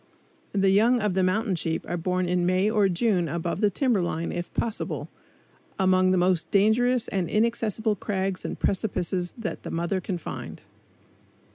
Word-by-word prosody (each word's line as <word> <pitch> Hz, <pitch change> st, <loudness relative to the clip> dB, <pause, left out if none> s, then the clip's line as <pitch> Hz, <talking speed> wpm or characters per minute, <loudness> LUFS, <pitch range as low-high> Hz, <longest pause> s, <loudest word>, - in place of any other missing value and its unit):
The 195 Hz, -1 st, +3 dB
young 230 Hz, +5 st, +4 dB
of 210 Hz, -3 st, 0 dB
the 190 Hz, -, +1 dB
mountain 195 Hz, +3 st, +1 dB
sheep 165 Hz, -1 st, -2 dB
are 175 Hz, -, -2 dB
born 180 Hz, +1 st, -1 dB
in 180 Hz, 0 st, +1 dB
May 185 Hz, +4 st, +2 dB
or 210 Hz, -3 st, +3 dB
June 180 Hz, -1 st, +1 dB
above 170 Hz, +4 st, -3 dB
the 210 Hz, -, +4 dB
timber 235 Hz, -1 st, +1 dB
line 170 Hz, -1 st, -2 dB
if 175 Hz, 0 st, -5 dB
possible, 230 Hz, -2 st, -3 dB, 0.7 s
among 185 Hz, -1 st, +3 dB
the 185 Hz, -, +3 dB
most 175 Hz, -2 st, +1 dB
dangerous 235 Hz, +4 st, +3 dB
and 185 Hz, -4 st, -1 dB
inaccessible 220 Hz, -1 st, 0 dB
crags 190 Hz, -1 st, -2 dB
and -, -, -4 dB
precipices 180 Hz, -2 st, -1 dB
that 225 Hz, -2 st, -4 dB
the -, -, -7 dB
mother 170 Hz, +3 st, -1 dB
can 180 Hz, 0 st, -3 dB
find. 170 Hz, -, -7 dB
190 Hz, 165 wpm, -26 LUFS, 175-215 Hz, 0.7 s, young